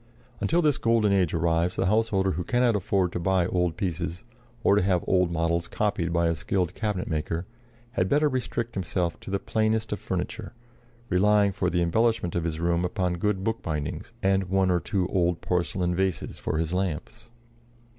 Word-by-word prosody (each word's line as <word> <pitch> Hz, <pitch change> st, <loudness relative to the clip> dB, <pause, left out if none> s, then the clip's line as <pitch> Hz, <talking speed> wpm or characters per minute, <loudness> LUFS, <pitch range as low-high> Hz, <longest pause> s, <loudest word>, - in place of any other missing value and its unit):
Until 170 Hz, +2 st, +2 dB
this 150 Hz, -3 st, +2 dB
golden 115 Hz, -3 st, +3 dB
age 95 Hz, -5 st, +2 dB
arrives 85 Hz, +2 st, +1 dB
the -, -, 0 dB
householder 100 Hz, -1 st, +2 dB
who 90 Hz, +2 st, -2 dB
cannot 120 Hz, +2 st, +2 dB
afford 95 Hz, -2 st, +1 dB
to -, -, -3 dB
buy 90 Hz, 0 st, +2 dB
old 90 Hz, -2 st, 0 dB
pieces, 90 Hz, -2 st, -3 dB, 0.4 s
or 100 Hz, -, +5 dB
to 105 Hz, -, +3 dB
have 90 Hz, -1 st, +1 dB
old 90 Hz, -2 st, +3 dB
models 85 Hz, 0 st, 0 dB
copied 100 Hz, -5 st, -1 dB
by 85 Hz, 0 st, +2 dB
a 85 Hz, -, +2 dB
skilled 90 Hz, +2 st, -1 dB
cabinet 105 Hz, -5 st, -2 dB
maker, 80 Hz, +2 st, -2 dB, 0.5 s
had 95 Hz, -6 st, 0 dB
better 150 Hz, +1 st, +3 dB
restrict 120 Hz, -3 st, -2 dB
himself 90 Hz, -2 st, -2 dB
to -, -, -10 dB
the 100 Hz, -, +1 dB
plainest 110 Hz, +2 st, 0 dB
of -, -, -2 dB
furniture, -, -, -4 dB, 0.6 s
relying 100 Hz, +2 st, +4 dB
for 90 Hz, -1 st, -1 dB
the 85 Hz, -1 st, +1 dB
embellishment 110 Hz, 0 st, +1 dB
of 85 Hz, -1 st, -1 dB
his 80 Hz, -1 st, -2 dB
room 85 Hz, 0 st, +1 dB
upon 90 Hz, -2 st, -1 dB
good 100 Hz, 0 st, 0 dB
bookbindings 80 Hz, -10 st, -3 dB
and 95 Hz, 0 st, +2 dB
one 95 Hz, -1 st, +2 dB
or 90 Hz, -, +3 dB
two 95 Hz, -1 st, -1 dB
old 90 Hz, -2 st, +1 dB
porcelain 90 Hz, 0 st, 0 dB
vases 95 Hz, -4 st, -2 dB
for -, -, -2 dB
his 80 Hz, +1 st, -1 dB
lamps. 90 Hz, +3 st, -3 dB
90 Hz, 180 wpm, -26 LUFS, 85-105 Hz, 0.6 s, or